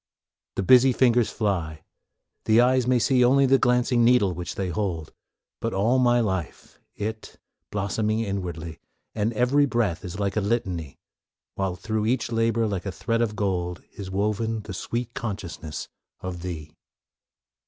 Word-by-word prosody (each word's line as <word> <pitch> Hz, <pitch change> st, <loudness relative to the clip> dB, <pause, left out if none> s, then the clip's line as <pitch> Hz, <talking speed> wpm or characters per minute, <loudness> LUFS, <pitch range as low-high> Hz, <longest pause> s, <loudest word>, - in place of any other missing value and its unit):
The 95 Hz, -, -1 dB
busy 130 Hz, +5 st, +6 dB
fingers 120 Hz, -2 st, +3 dB
fly, 85 Hz, -7 st, -2 dB, 0.6 s
the 110 Hz, +1 st, +5 dB
eyes 125 Hz, 0 st, +4 dB
may 125 Hz, 0 st, +4 dB
see 125 Hz, +2 st, +3 dB
Only 135 Hz, +3 st, +5 dB
the 135 Hz, 0 st, +4 dB
glancing 125 Hz, 0 st, +3 dB
needle 115 Hz, -6 st, +4 dB
which 90 Hz, 0 st, -5 dB
they 95 Hz, -2 st, -2 dB
hold, 85 Hz, -3 st, -3 dB, 0.5 s
But 115 Hz, -2 st, -2 dB
all 115 Hz, +7 st, +3 dB
my 120 Hz, -1 st, +4 dB
life 95 Hz, -7 st, -3 dB, 0.2 s
it, 110 Hz, +1 st, -5 dB, 0.3 s
blossoming 105 Hz, +2 st, -1 dB
inwardly, 90 Hz, -6 st, -4 dB, 0.3 s
And 110 Hz, +1 st, 0 dB
every 130 Hz, +5 st, +3 dB
breath 115 Hz, -10 st, 0 dB
is 90 Hz, +2 st, -6 dB
like 100 Hz, -1 st, -1 dB
a 110 Hz, -, +1 dB
litany, 95 Hz, -, -2 dB, 0.6 s
While 95 Hz, -2 st, -2 dB
through 110 Hz, +3 st, -2 dB
each 120 Hz, 0 st, 0 dB
labor, 115 Hz, 0 st, +1 dB
like 100 Hz, -2 st, -3 dB
a -, -, -2 dB
thread 115 Hz, +5 st, -1 dB
of 110 Hz, -3 st, 0 dB
gold, 90 Hz, -4 st, -2 dB
Is 100 Hz, -2 st, -8 dB
woven 105 Hz, +3 st, -1 dB
the 95 Hz, -, -8 dB
sweet 120 Hz, +5 st, -4 dB
consciousness 95 Hz, -, -5 dB, 0.3 s
of 90 Hz, -2 st, -6 dB
Thee. 80 Hz, -4 st, -6 dB
105 Hz, 155 wpm, -25 LUFS, 95-120 Hz, 0.6 s, busy